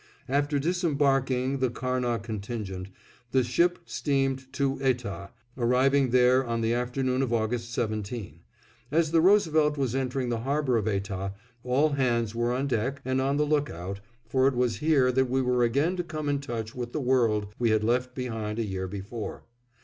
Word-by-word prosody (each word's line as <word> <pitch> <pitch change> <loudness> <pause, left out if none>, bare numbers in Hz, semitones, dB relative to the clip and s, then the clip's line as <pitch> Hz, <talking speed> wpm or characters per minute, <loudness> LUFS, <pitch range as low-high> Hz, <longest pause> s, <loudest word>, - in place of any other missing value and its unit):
After 145 +2 +1
disembarking 140 -5 +1
the 130 -1 +2
Karnah 125 -1 -1
contingent, 105 -4 -5 0.5
the 130 -1 +4
ship 170 +9 +2
steamed 135 -2 -1
to 135 -1 0
Etah, 120 -7 -1 0.3
arriving 130 +2 +3
there 125 +1 +4
on 115 -2 -2
the 115 +1 +1
afternoon 125 +2 0
of 130 -3 -1
August 115 +1 -1
17. 110 -6 -3 0.5
As 160 0 +2
the 165 -1 +4
Roosevelt 160 -6 +4
was 130 -4 0
entering 130 -1 -1
the 120 -1 -1
harbor 135 +1 0
of 110 -2 0
Etah, 100 -1 -2 0.3
all 130 +5 +2
hands 120 -6 0
were 120 +1 0
on 130 +3 0
deck 130 +1 -1
and 130 0 +1
on 140 +2 +1
the 150 - +2
lookout, 100 - -2 0.3
for 130 +3 +3
it 135 - +1
was 120 -2 +1
here 150 -5 +3
that 130 0 +1
we 130 +2 +1
were 125 -1 +2
again 140 +10 +2
to 175 - -1
come 155 -3 -5
in 140 -1 +1
touch 115 -5 -5
with 120 -1 -5
the - - -1
world 115 -6 +1
we 120 -1 +2
had 110 -1 +2
left 125 +3 0
behind 110 -4 -3
a 115 - 0
year 95 -2 -3
before. 100 +4 -6
125 Hz, 175 wpm, -27 LUFS, 115-140 Hz, 0.5 s, the